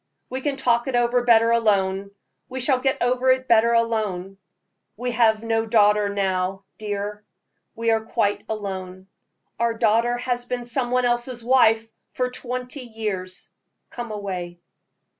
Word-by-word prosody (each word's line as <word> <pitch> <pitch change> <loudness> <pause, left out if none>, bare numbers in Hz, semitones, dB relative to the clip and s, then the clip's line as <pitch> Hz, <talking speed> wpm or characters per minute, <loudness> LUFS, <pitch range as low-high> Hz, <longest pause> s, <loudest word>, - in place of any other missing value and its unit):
We 260 +1 -3
can 285 0 -1
talk 240 -2 +1
it 265 - -1
over 240 +1 +2
better 230 -1 +5
alone 200 -4 +1 0.4
we 260 0 -5
shall 260 0 +2
get 265 +1 0
over 250 +1 +2
it 260 0 +2
better 230 0 +5
alone. 210 -5 -1 0.6
We 245 +2 -2
have 225 -2 +3
no 225 0 0
daughter 210 -2 +4
now, 195 -1 -1 0.2
dear 205 0 -4 0.5
we 230 0 +1
are 225 0 +2
quite 220 -2 0
alone. 190 -3 -5 0.5
Our 235 -1 +1
daughter 230 +2 +2
has 245 0 -2
been 245 -1 -4
some 245 +1 -1
one 250 0 +2
else's 240 0 -1
wife 225 -3 +3 0.2
for 250 0 -1
twenty 250 +2 -5
years. 210 -6 -5 0.4
Come 240 -1 -6
away!" 185 -5 -5
230 Hz, 145 wpm, -23 LUFS, 205-245 Hz, 0.6 s, better